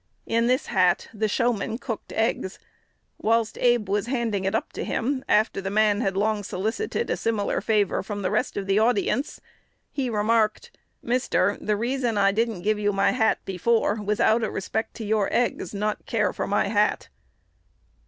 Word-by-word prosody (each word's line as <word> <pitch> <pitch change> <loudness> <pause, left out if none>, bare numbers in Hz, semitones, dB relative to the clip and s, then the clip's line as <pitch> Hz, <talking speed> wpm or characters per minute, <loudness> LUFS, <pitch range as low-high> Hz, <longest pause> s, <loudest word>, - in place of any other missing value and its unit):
In 230 +1 +1
this 255 +1 +2
hat 180 -1 +2
the 215 0 0
"showman 225 0 0
cooked 230 -3 -6
eggs." 220 -4 -1 0.6
Whilst 225 0 +1
Abe 240 -4 +3
was 205 +3 0
handing 230 -6 -1
it 195 +3 0
up 225 - -2
to - - -4
him, 260 +3 -1
after 215 -2 +2
the 195 - -3
man 210 +1 +2
had 195 -3 -1
long 210 +1 +1
solicited 220 - -2
a - - +2
similar 220 -3 -1
favor 210 -3 +1
from 205 0 -5
the 185 - 0
rest - - -1
of 200 - -2
the 195 +1 +2
audience, 240 +4 +1 0.5
he 265 -3 -2
remarked, 225 - 0 0.3
"Mister, 235 -5 +1
the 210 -1 0
reason 240 0 -1
I 195 -1 +4
didn't 220 -3 -1
give 215 0 +1
you 205 0 +1
my 195 0 +2
hat 220 -3 +1
before 210 +3 +1
was 210 0 -1
out 225 +2 +4
of 220 - -2
respect 220 +4 -3
to 225 - -6
your 210 -1 +1
eggs, 245 - 0
not 210 +1 -3
care - - +1
for - - -3
my - - +1
hat." - - +1
215 Hz, 180 wpm, -25 LUFS, 205-235 Hz, 0.6 s, I